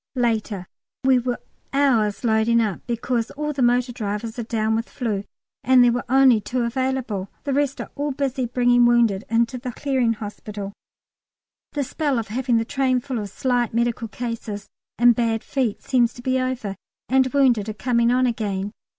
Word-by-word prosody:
Later. 220 -6 0 0.4
We 260 -1 +5
were 245 0 -2 0.4
hours 245 -8 +2
loading 225 0 +3
up 215 -5 0
because 235 0 -1
all 300 +1 -3
the 270 - -3
motor 245 0 +3
drivers 220 0 -4
are - - -2
down 220 -1 0
with 225 +1 -1
flu, 215 -6 -3 0.4
and 255 -1 +6
there 240 - +5
were 245 +1 -2
only 260 -4 +5
two 250 +3 -2
available. 235 -5 -2
The 280 - -1
rest 280 0 0
are - - -6
all 290 +1 -2
busy 265 -2 -1
bringing 245 0 +4
wounded 230 -4 +3
in 230 +1 +3
to 250 +2 -7
the 250 0 -5
Clearing 260 -4 +1
Hospital. 205 -1 -7 1.0
The 290 - 0
spell 285 0 -1
of 225 -3 -3
having 245 +1 +1
the 225 - 0
train 260 -1 +1
full 250 -1 -4
of 205 -1 -5
slight 245 +1 0
medical 235 -1 0
cases 225 -3 -5 0.3
and 240 +1 +6
bad 225 -1 0
feet 250 -7 -2
seems 245 -3 +2
to 245 - -11
be 260 0 +1
over, 255 -6 -2 0.3
and 260 0 +3
wounded 245 -7 +3
are - - -3
coming 235 +2 +1
on 255 +1 +3
again. 205 -4 -2
240 Hz, 180 wpm, -23 LUFS, 220-260 Hz, 1.0 s, and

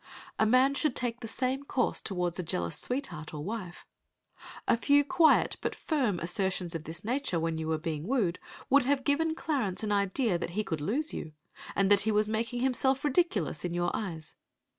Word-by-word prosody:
A 220 - +4
man 255 +4 +5
should 295 -1 +1
take 245 -1 -1
the 225 - -6
same 260 +4 -1
course 265 -3 0
toward 180 -3 -1
a - - +2
jealous 85 - -2
sweetheart 180 - -4
or 150 - -5
wife. 190 -3 -6 0.8
A - - +5
few 285 +5 +4
quiet 330 +1 +4
but - - -2
firm 260 - 0
assertions 180 0 -1
of 165 -2 -5
this 165 +2 -7
nature, 245 -6 -1
when 165 0 -1
you 160 - -3
were 160 0 +1
being 155 0 -4
wooed, 215 -9 +1 0.3
would 275 -1 +4
have 275 0 +1
given 315 +3 +1
Clarence 245 - -2
an 210 - -1
idea 200 0 +1
that 170 - -3
he 215 - +2
could 160 -6 -3
lose 275 - -1
you, 155 - -6 0.4
and 195 0 +2
that 200 -1 +6
he 220 - +1
was 210 0 +3
making 230 +3 -2
himself 265 +1 +2
ridiculous 265 - +1
in 175 -1 -2
your 175 0 +1
eyes. 165 -7 -5
215 Hz, 195 wpm, -30 LUFS, 175-265 Hz, 0.8 s, that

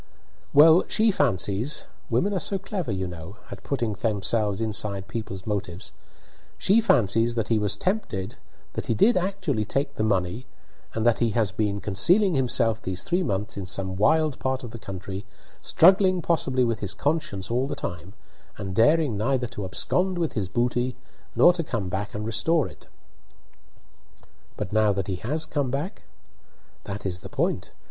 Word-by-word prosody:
"Well, 160 +4 +7
she 220 0 +3
fancies 120 - 0 0.2
women 155 - +1
are 190 - 0
so 195 +4 0
clever, 190 - -4
you 95 -1 -2
know, 90 +3 -9
at - - -8
putting 120 -6 -2
themselves 105 -1 0
inside 105 -3 -2
people's 95 -5 -6
motives 100 -3 -4 0.6
she 210 +4 +4
fancies 115 - +2
that 115 -3 -1
he 115 -2 +3
was 105 -2 0
tempted, 115 - -2 0.4
that - - -4
he 115 - +1
did 230 - +4
actually 185 - -1
take 140 +6 -2
the 110 - -2
money, 100 +3 0 0.5
and 110 0 -1
that 120 -2 +4
he 120 - +2
has 110 -4 +2
been 100 0 -1
concealing 175 - +3
himself 120 -4 +1
these 95 0 -4
three 175 +2 0
months 105 - -2
in 95 -2 -5
some 95 0 -1
wild 155 +7 +2
part 130 0 -1
of 120 - -7
the 115 - -8
country, 95 0 -6 0.4
struggling 185 +1 +5
possibly 130 -6 +1
with 115 -3 0
his 100 0 -3
conscience 115 - -2
all 125 +3 +1
the - - -3
time, 85 +2 -6 0.4
and 95 -1 -5
daring 140 +2 +4
neither 125 +3 +1
to 105 -4 -6
abscond 180 - 0
with 165 -3 -1
his 100 -5 -2
booty 120 +3 0 0.4
nor 175 - +7
to 170 -1 -2
come 115 - -3
back 100 +3 -4
and 105 0 -3
restore 155 +8 +1
it." - - -15 1.7
"But 90 - -4
now 110 -1 +4
that 100 -2 -2
he 95 -1 -3
has 150 - -1
come 145 -4 -1
back?" 145 - -3 0.8
"That 100 0 -6
is 90 -1 -2
the - - -10
point. - - -1
115 Hz, 170 wpm, -25 LUFS, 100-150 Hz, 1.7 s, Well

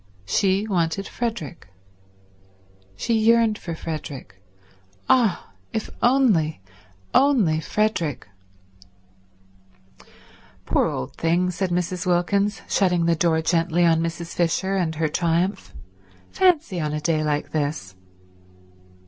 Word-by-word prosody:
She 195 - +1
wanted 180 0 -1
Frederick. 195 - -5 1.3
She 230 - -2
yearned 225 -1 +3
for 170 -2 -6
Frederick. 145 - -7 0.7
Ah, 225 - +2 0.2
if 220 - -3
only, 225 - +3 0.5
only 235 - +3
Frederick... 170 - -1 2.4
"Poor - - +2
old 65 - -5
thing," 175 +2 +1
said 185 +1 -2
Mrs. 180 +1 -2
Wilkins, 200 +4 +1
shutting 180 -4 +2
the 170 - +3
door 160 -1 +1
gently 170 +1 +2
on 165 -1 +3
Mrs. 165 0 -4
Fisher 185 +3 0
and 170 -4 -1
her 160 +1 0
triumph. 170 +4 -1 0.6
"Fancy 325 - +2
on 150 -2 -2
a 150 - -1
day 155 0 0
like 150 -1 -2
this." 145 -11 -3
175 Hz, 105 wpm, -23 LUFS, 160-200 Hz, 2.4 s, yearned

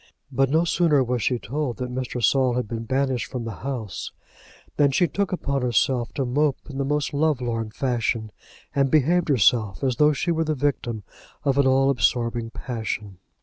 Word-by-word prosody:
But 135 0 +2
no 160 +4 +3
sooner 160 -5 +3
was 125 -1 -1
she 125 - +1
told 130 +2 -3
that 125 -1 -4
Mr. 125 -1 -3
Saul 130 -1 +3
had 125 -3 -1
been 115 +1 -5
banished 130 -4 0
from 125 +2 -5
the 115 -4 -6
house, 120 -8 -4 0.6
than 145 -1 +4
she 175 +6 +2
took 200 +3 -2
upon 140 -6 -1
herself 120 0 +1
to 135 - 0
mope 145 +3 +1
in 135 -2 -6
the - - +1
most 145 -1 -1
love 150 -1 +2
lorn 115 -3 -2
fashion, 115 -2 -1 0.4
and 140 -1 +2
behaved 160 +4 +3
herself 110 -3 +2
as 130 -3 +1
though 150 0 +5
she 170 +4 -1
were 165 -1 +1
the 155 -1 -1
victim 125 -6 -2 0.4
of 140 0 +2
an 140 - +4
all 135 +1 +4
absorbing 120 -2 0
passion. 110 -6 -5
130 Hz, 190 wpm, -24 LUFS, 120-145 Hz, 0.6 s, though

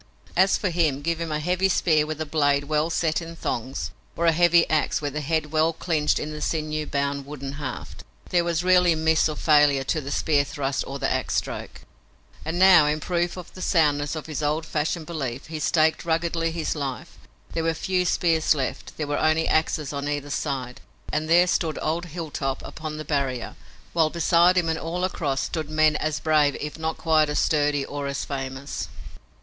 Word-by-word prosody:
As 190 +2 +4
for 185 - -1
him, 155 -5 +1
give 170 +1 -1
him 165 -1 -3
a 150 - -1
heavy 180 +4 +1
spear, 155 -4 +2
with 155 -1 -4
the 155 - -3
blade 145 -2 +2
well 155 +2 0
set 165 -1 0
in 165 0 -8
thongs, 120 - -3 0.2
or 170 - -1
a 165 - +6
heavy 170 +1 +4
ax, 155 -1 +1
with 145 -2 -4
the 150 - -2
head 155 0 -1
well 160 +1 +2
clinched 155 -2 0
in 150 - -4
the 150 0 -7
sinew 155 0 -2
bound 140 0 -2
wooden 140 -2 -6
haft. 130 -3 -6 0.3
There 175 -1 +2
was 170 0 -1
rarely 180 -2 +4
miss 160 0 +2
or 155 - -3
failure 145 -3 +4
to 155 +4 -1
the 140 - -7
spear 145 0 +2
thrust 135 -1 -2
or 135 - -5
the - - -1
ax - - -1
stroke. - - -4 0.6
And 160 +2 -3
now, 180 -5 +7
in 150 +1 0
proof 175 +2 -1
of 180 - -9
the 185 - -10
soundness 150 -4 +2
of 155 - -5
his 155 -2 -4
old 150 +2 0
fashioned 155 +1 -2
belief, 140 -6 -4
he 160 -1 -6
staked 155 +1 +2
ruggedly 165 0 0
his 165 -1 -2
life. 140 -4 -5 0.3
There 165 - -1
were 165 0 0
few 185 +2 0
spears 165 -3 +2
left. 135 -3 -4
There 155 - -2
were 145 0 -1
only 155 +1 +2
axes 155 -2 0
on 140 0 -3
either 145 -1 -3
side. 130 -4 -3 0.3
And 155 +1 -1
there 175 +2 +6
stood 165 -3 0
old 165 +3 -1
Hilltop 150 -5 -4
upon 155 -1 -6
the 155 - -6
barrier, 135 -4 -2 0.4
while 160 -2 +3
beside 170 +2 +3
him 175 -2 +2
and 160 0 -1
all 175 +2 -3
across 150 -7 -1
stood 155 -3 -3
men 155 0 +3
as 155 -1 -2
brave 150 -3 +2
if 150 +2 -6
not 160 0 -2
quite 155 -2 +3
as 150 - -1
sturdy 145 -2 +1
or 145 -1 -4
as 140 -1 -3
famous. 135 0 -5
155 Hz, 200 wpm, -24 LUFS, 145-165 Hz, 0.6 s, now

